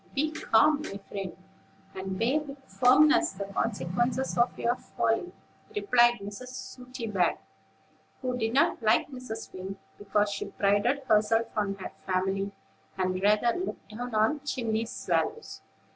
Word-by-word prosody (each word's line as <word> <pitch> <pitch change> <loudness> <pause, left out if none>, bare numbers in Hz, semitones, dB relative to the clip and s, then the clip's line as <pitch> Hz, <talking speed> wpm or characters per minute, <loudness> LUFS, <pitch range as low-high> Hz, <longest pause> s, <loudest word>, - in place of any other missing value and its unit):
"Be 305 +3 +1
calm, 300 0 +3
my 200 -10 -5
friend, 195 -2 -5 0.6
and 190 0 -4
bear 250 +8 +2
with 285 -2 -8
firmness 305 +8 +4
the 195 +1 -4
consequences 225 +5 -1
of 240 +1 +2
your 235 - +1
folly," 255 +9 -1 0.4
replied 240 -13 +4
Mrs. 205 +5 -7
Sooty 255 -1 -7
back, 190 -5 +1 0.8
who 250 -1 -1
didn't 240 +3 +2
like 225 +5 +3
Mrs. 255 -4 -7
Wing, 190 +1 -6 0.2
because 205 0 +1
she - - -3
prided 205 +8 +1
herself 225 -1 +3
on 205 -2 0
her 190 - -7 0.2
family, 190 +1 0 0.5
and 185 0 0
rather 210 +4 +3
looked 370 - -5
down 235 +2 -5
on 220 +8 +3
chimney 230 -5 -2
swallows. 455 - -2
225 Hz, 135 wpm, -28 LUFS, 200-255 Hz, 0.8 s, firmness